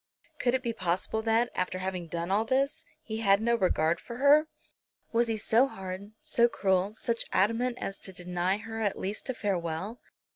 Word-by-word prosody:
Could 245 0 +2
it 260 - -1
be 235 -2 -1
possible 185 +3 -1
that, 230 +2 +2
after 185 0 -1
having 185 -2 -4
done 170 +2 -3
all 205 +3 +3
this, 265 +4 0 0.2
he 220 -1 -4
had 200 -3 +4
no 235 +2 +2
regard 170 -6 +2
for 235 - -8
her? 290 +3 +6 0.6
Was 235 0 +2
he 225 -1 -1
so 230 +5 +4
hard, 190 -1 -7
so 235 0 +4
cruel, 195 -2 +1
such 230 +1 -1
adamant 235 +5 +1
as 195 - -4
to 190 - -7
deny 180 +1 -1
her 225 +1 -6
at 205 -3 0
least 205 +7 -4
a 260 - -1
farewell? 190 +2 -2
215 Hz, 185 wpm, -29 LUFS, 185-235 Hz, 0.6 s, her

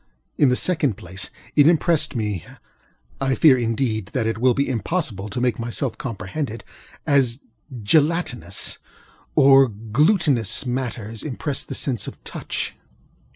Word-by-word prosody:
In 145 - +4
the 125 - +3
second 150 - +1
place, 90 +3 -5 0.3
it 145 -1 +6
impressed 160 -3 +2
me 105 -6 -2 0.8
(I 135 -1 +1
fear, 150 -5 +6
indeed, 115 -3 -1
that 125 -4 0
it 110 0 -1
will 125 0 +3
be 140 - +1
impossible 120 - -2
to 105 - -4
make 120 -3 0
myself 120 +1 -3
comprehended) 115 0 -5 0.4
as 135 -2 +2 0.4
gelatinous 140 - +1 0.6
or 135 0 +7
glutinous 120 - +1
matters 120 -4 -4
impress 145 0 -3
the - - -7
sense 120 -8 -1
of - - -7
touch. - - -4
125 Hz, 130 wpm, -22 LUFS, 110-145 Hz, 0.8 s, or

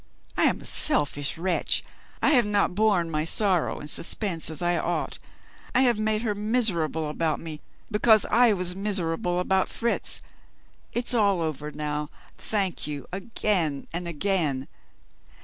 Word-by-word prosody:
I - - +2
am - - +1
a - - -12
selfish 145 - +2
wretch; 180 +1 0 0.4
I - - +4
have 245 -7 +4
not 205 -3 +1
borne 195 -5 +1
my 155 -1 -1
sorrow 185 +1 +2
and 145 - -8
suspense 165 +1 +1
as 160 -2 -4
I 175 0 +1
ought; - - -3 0.6
I 255 - +5
have 240 -4 +2
made 215 +1 0
her 215 -3 0
miserable 205 -8 0
about 155 0 -1
me, 155 -2 -8 0.3
because 215 0 +5
I 240 +1 +5
was 180 -2 0
miserable 180 -3 -1
about 190 +1 +1
Fritz. 235 0 -1 0.7
It's 240 +1 +4
all 200 -5 +2
over 150 -2 -4
now. 150 0 -4 0.3
Thank 195 -7 -2
you 145 -3 -5
again 190 -7 0
and 175 +1 -3
again. 165 -6 0
180 Hz, 150 wpm, -25 LUFS, 155-210 Hz, 0.7 s, I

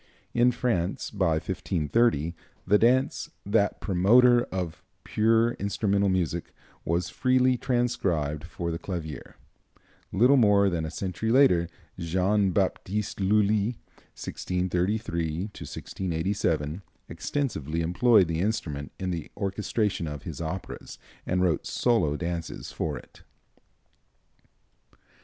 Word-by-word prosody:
In 120 +1 +4
France, 100 -8 -1
by 95 -6 +1
1530, 85 +1 0 0.3
the 105 +3 +4
dance, 130 +3 +2 0.2
that 100 0 +1
promoter 120 +6 +5
of 90 -4 -4 0.2
pure 115 +2 +3
instrumental 100 0 +1
music, 85 -2 -1 0.3
was 85 +1 -1
freely 130 0 +3
transcribed 95 - 0
for 85 0 -4
the 80 - -4
clavier. 80 -7 -6 0.8
Little 125 +8 +5
more 100 -4 +5
than 80 -2 -1
a - - -5
century 95 +5 -3
later, 90 -11 +4 0.3
Jean 95 +4 +1
Baptiste 100 +2 -1
Lully 105 +3 +2 0.4
(1633 90 -2 -2
1687) 85 -2 -2 0.3
extensively 85 - -2
employed 95 +4 +4
the 80 -1 -2
instrument 75 - -2
in 95 -1 -3
the 85 -3 -4
orchestration 100 -2 -1
of 75 -2 -6
his - - -6
operas, 85 +4 -6 0.3
and 90 0 +1
wrote 85 -4 +1
solo 90 -12 +1
dances 85 -1 -4
for - - -3
it. - - -15
95 Hz, 105 wpm, -27 LUFS, 85-110 Hz, 0.8 s, promoter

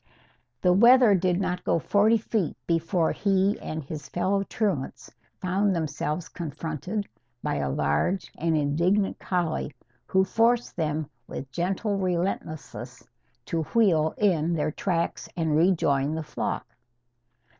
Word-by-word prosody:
The 180 - +5
wether 235 +2 +7
did 180 -1 +2
not 180 -2 -2
go - - +2
forty 210 +7 +3
feet 215 -5 -2
before 165 0 +1
he 195 0 +1
and 155 0 -4
his 145 0 -7
fellow 190 +3 0
truants 195 -8 -2 0.3
found 190 +2 +1
themselves 155 +1 -2
confronted 170 +5 -4 0.4
by - - -1
a 70 -1 -1
large 75 - 0
and 165 0 0
indignant 170 +8 +1
collie, 165 -6 -2 0.3
who 190 0 +3
forced 230 +5 +2
them 155 -2 -1 0.2
with 135 - -7
gentle 195 - -1
relentlessness 165 - -3 0.4
to 165 - -1
wheel 165 -9 +3
in 170 -5 +2
their 155 -1 0
tracks 170 0 -2
and 160 -3 +1
rejoin 155 -4 +2
the 160 - -3
flock. 150 - -3
175 Hz, 125 wpm, -26 LUFS, 155-195 Hz, 0.4 s, wether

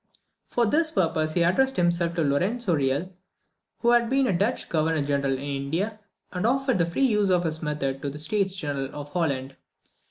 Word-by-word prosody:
For 240 - +1
this 315 +8 +2
purpose 160 - 0
he 175 - +3
addressed 265 +10 +2
himself 170 -1 +1
to 165 - +1
Lorenzo 185 +9 0
Real, 145 +6 -1 0.7
who 235 - +3
had 240 -1 +3
been 270 +1 +2
the 240 - +1
Dutch 205 +8 0
Governor 160 -1 +1
General 140 -1 0
in 135 +1 -4
India, 150 +10 -3 0.3
and 180 - -3
offered 265 -3 +1
the 170 - +2
free 220 +11 +1
use 210 -5 +2
of 180 -1 +3
his 160 -1 -2
method 140 -3 -2
to 140 - -2
the 140 - -8
States 190 +5 -1
General 140 -6 -3
of 145 0 -7
Holland. 140 -6 -1
170 Hz, 190 wpm, -25 LUFS, 145-210 Hz, 0.7 s, he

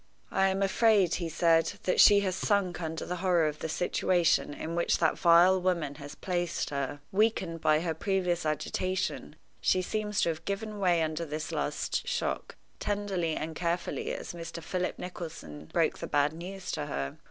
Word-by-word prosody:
"I 195 0 +3
am 195 +1 0
afraid," 195 -2 +3
he 170 - -2
said, 165 0 +3
"that 180 - +1
she 205 -1 +8
has 190 -2 -1
sunk 190 -3 0
under 160 0 -4
the 180 - -3
horror 175 -2 +2
of 150 0 -4
the 160 - -4
situation 175 -1 +1
in 160 +3 -5
which 170 - +2
that 160 -2 +2
vile 175 +2 +5
woman 175 -6 0
has 145 0 -8
placed 175 -4 -2
her. 140 +1 -3
Weakened 190 -5 +1
by 155 0 +3
her 165 -1 -1
previous 180 0 0
agitation, 185 +4 -2 0.3
she 185 - +2
seems 210 +1 -2
to - - +2
have 160 0 -4
given 205 +2 -4
way 175 -4 +3
under 160 +1 -2
this 155 0 -4
last 480 - -2
shock, 485 0 -2 0.2
tenderly 195 -6 -1
and 160 +1 -4
carefully 170 +1 -2
as - - -5
Mr. 170 -1 -7
Philip 180 +2 -2
Nicholson 165 - -7
broke - - 0
the - - -5
bad 145 +1 +2
news 180 +3 -6
to 150 - -3
her. 70 - -4
175 Hz, 175 wpm, -29 LUFS, 160-190 Hz, 0.3 s, she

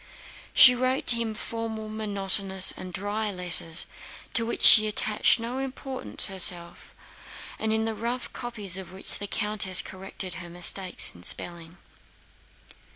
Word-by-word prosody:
She 250 - +8
wrote 255 +2 -2
to 240 - +7
him 230 -2 -4
formal, 225 -1 -6
monotonous, 195 -3 +1
and 185 0 -9
dry 205 +3 -4
letters, 175 -3 0 0.5
to 230 -1 +3
which - - -4
she 215 -1 +9
attached 215 +2 +1
no 240 +3 -6
importance 270 0 -2
herself, 175 -3 0 0.6
and 220 0 -3
in 220 0 -1
the 225 - -3
rough 235 +3 -6
copies 210 -7 -2
of 190 -2 -10
which 190 +1 -6
the 205 - -7
countess 205 -3 +2
corrected 190 -1 -8
her 175 - -11
mistakes 180 +2 -1
in 85 - -17
spelling. 170 - -5
210 Hz, 140 wpm, -24 LUFS, 185-225 Hz, 0.6 s, she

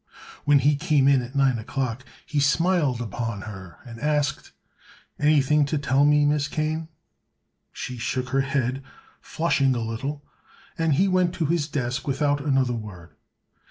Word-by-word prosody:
When 145 0 +5
he 145 +2 +3
came 150 -3 +2
in 140 -2 +4
at 125 +3 -9
nine 135 -4 +2
o'clock 130 +1 -3 0.2
he 150 -3 -1
smiled 145 -2 +2
upon 115 -1 -4
her 95 -6 -9
and 115 -2 -10
asked: 145 0 -1 0.7
"Anything 150 0 +3
to 145 +2 -1
tell 140 0 +2
me, 150 0 +4
Miss 145 -1 +1
Kane?" 155 +1 -2 0.8
She 125 -1 -6
shook 125 +2 -2
her 135 +1 +2
head, 135 -1 -1 0.4
flushing 140 -5 +1
a - - -1
little, 125 +6 -4 0.5
and 165 -3 +1
he 190 +7 +3
went 185 -2 +1
to 165 - -1
his 155 -1 0
desk 130 -1 -3
without 145 +1 +1
another 135 -4 +1
word. 105 -7 -8
140 Hz, 155 wpm, -24 LUFS, 125-150 Hz, 0.8 s, When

